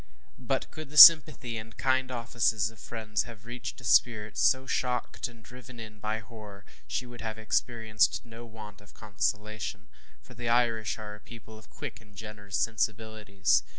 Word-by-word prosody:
But - - -3
could 155 -2 -9
the 150 - -8
sympathy 150 -8 +9
and 115 +1 -9
kind 130 -1 +1
offices 115 -3 0
of 110 - -19
friends 110 0 -3
have 110 -2 -13
reached 120 +1 -7
a - - -16
spirit 110 -3 +2
so 75 - +2
shocked 125 -2 -2
and 115 -2 -17
driven 125 +2 -13
in 110 -1 -10
by 110 +1 -3
horror, 105 -3 -13 0.2
she 125 - -3
would 120 -1 -11
have 110 -1 -5
experienced 110 0 0
no 115 0 -11
want 110 -3 -12
of 105 - -19
consolation, 105 -1 -4 0.3
for 60 - -17
the 120 -1 -5
Irish 115 -2 +1
are 105 -1 -8
a 105 - -12
people 110 0 -13
of 110 - -16
quick - - -8
and 105 -2 -21
generous 105 -1 -6
sensibilities. 110 - 0
110 Hz, 170 wpm, -28 LUFS, 105-120 Hz, 0.3 s, sympathy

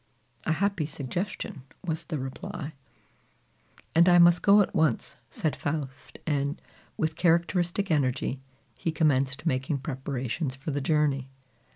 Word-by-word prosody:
"A 160 - +2
happy 190 -3 0
suggestion!" 165 - -4 0.2
was 160 -2 -2
the 155 - -3
reply. 135 +3 -6 1.2
"And 170 +2 +6
I 175 - +7
must 175 0 +7
go 205 +1 +7
at 195 - -1
once," 155 -7 +1
said 155 +5 -1
Faust; 145 -2 -4
and, 145 -1 0 0.4
with 160 0 0
characteristic 175 +2 +2
energy, 135 -2 0 0.4
he 165 - 0
commenced 140 -4 +1
making 135 -1 0
preparations 135 0 -3
for 135 +3 -5
the 145 0 -1
journey. 140 -3 +1
155 Hz, 130 wpm, -28 LUFS, 135-170 Hz, 1.2 s, I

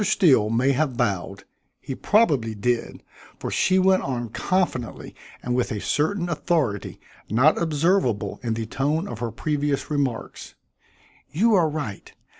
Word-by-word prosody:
Steele 135 - +4
may 125 +5 +2
have 135 -2 0
bowed; 100 -1 -2 0.4
he 135 - -6
probably 140 - +2
did, 120 +3 -2 0.3
for - - -5
she 185 - +2
went 190 0 +4
on 120 -3 -3
confidently 150 - -2 0.3
and 125 - -2
with 125 0 0
a 105 - -2
certain 175 - 0
authority 150 - -1 0.3
not 130 +11 +3
observable 150 - +1
in 115 -2 -2
the 115 0 -3
tone 150 - -1
of 115 - -7
her 120 0 -2
previous 145 +4 -2
remarks. 140 -5 -3 0.7
"You 220 +8 +2
are 175 -6 +4
right. 145 -10 -6
140 Hz, 140 wpm, -24 LUFS, 115-165 Hz, 0.7 s, Steele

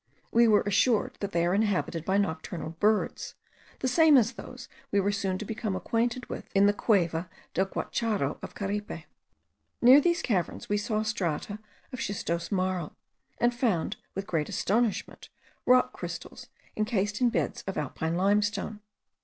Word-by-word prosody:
We 235 0 +5
were 210 -2 +5
assured 210 +3 +2
that 200 0 -3
they 170 -2 +1
are 175 - +1
inhabited 195 -5 0
by 190 +1 +2
nocturnal 160 -3 -2
birds, 210 0 +1 0.5
the 260 - +1
same 310 +2 +6
as 235 0 +3
those 235 +4 -10 0.2
we 200 - +3
were 200 +1 +1
soon 195 -2 -1
to 215 - -6
become 215 -2 -3
acquainted 235 +6 -1
with - - -7
in 195 +1 +6
the 205 - +4
Cueva 175 -6 +1 0.2
del 190 +1 +1
Guacharo 220 +1 -2
of - - -8
Caripe. 205 +1 -4 0.8
Near 255 +4 +8
these 345 +2 +1
caverns 190 -8 -1
we 205 - +1
saw 215 +1 -1
strata 205 -1 -2 0.3
of 255 - -5
schistose 170 -6 -3
marl, 185 -4 -1 0.4
and 240 0 +3
found, 230 -9 0 0.2
with 195 - -3
great 165 -7 -1
astonishment, 225 +1 -1 0.4
rock 250 0 +5
crystals - - -7 0.3
encased 210 -1 -1
in 245 - +5
beds 230 - -2
of 195 - -3
alpine 160 +3 -2
limestone. 205 +2 +1
205 Hz, 155 wpm, -28 LUFS, 185-230 Hz, 0.8 s, Near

